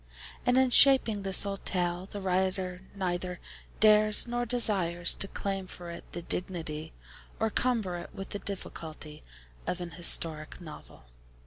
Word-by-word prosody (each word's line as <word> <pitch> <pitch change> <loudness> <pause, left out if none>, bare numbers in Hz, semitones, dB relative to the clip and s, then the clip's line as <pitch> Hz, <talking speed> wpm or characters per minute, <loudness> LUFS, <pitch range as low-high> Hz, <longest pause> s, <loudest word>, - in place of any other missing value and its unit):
And 250 +1 +4
in 260 -1 +4
shaping 245 -6 +6
this 195 0 +4
old 200 -1 -4
tale, 180 0 -1
the 205 - -6
Writer 185 -1 -1
neither 180 -2 -3 0.4
dares, 215 0 +5
nor 240 0 -2
desires, 185 -8 +2
to 195 - -1
claim 195 -1 -3
for 175 -2 -9
it 170 - -10
the 175 - -5
dignity 160 -4 -3 0.5
or 220 0 +1
cumber 220 -9 0
it 175 - -8
with 195 - -7
the 205 - -3
difficulty 155 -6 -7 0.5
of 180 - -1
an 175 -1 -6
historic 165 -2 -1
novel. 155 - -12
185 Hz, 145 wpm, -29 LUFS, 175-210 Hz, 0.5 s, shaping